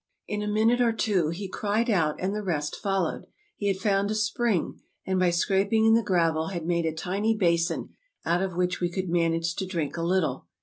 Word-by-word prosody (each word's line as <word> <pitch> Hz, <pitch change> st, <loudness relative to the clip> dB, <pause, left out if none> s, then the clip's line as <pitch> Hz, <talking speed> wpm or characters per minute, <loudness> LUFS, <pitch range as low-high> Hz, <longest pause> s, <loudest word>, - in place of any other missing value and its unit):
In 210 Hz, 0 st, -3 dB
a 210 Hz, -, -3 dB
minute 220 Hz, +4 st, +2 dB
or 235 Hz, -2 st, +3 dB
two 195 Hz, -8 st, +1 dB
he 185 Hz, +4 st, -4 dB
cried 210 Hz, +4 st, -1 dB
out, 165 Hz, -9 st, +2 dB
and 190 Hz, +2 st, -1 dB
the 210 Hz, -, -2 dB
rest 150 Hz, -7 st, -2 dB
followed; 195 Hz, -2 st, -2 dB, 0.3 s
he 205 Hz, -, -3 dB
had 195 Hz, -1 st, +1 dB
found 200 Hz, -1 st, +1 dB
a 215 Hz, -, -1 dB
spring, 215 Hz, -3 st, 0 dB, 0.2 s
and 190 Hz, -1 st, 0 dB
by 180 Hz, -1 st, +4 dB
scraping 195 Hz, +5 st, +2 dB
in 225 Hz, -, +6 dB
the 230 Hz, -, +5 dB
gravel 165 Hz, -5 st, +1 dB
had 170 Hz, -3 st, -4 dB
made 170 Hz, -1 st, 0 dB
a -, -, 0 dB
tiny 200 Hz, +7 st, -1 dB
basin 170 Hz, -3 st, +1 dB, 0.4 s
out 170 Hz, +2 st, +1 dB
of 190 Hz, -2 st, -2 dB
which 180 Hz, 0 st, 0 dB
we 175 Hz, -, +1 dB
could 185 Hz, 0 st, -3 dB
manage 165 Hz, 0 st, +1 dB
to 190 Hz, -, -2 dB
drink 165 Hz, -4 st, -3 dB
a -, -, -2 dB
little. 165 Hz, -, 0 dB
185 Hz, 215 wpm, -26 LUFS, 170-210 Hz, 0.4 s, in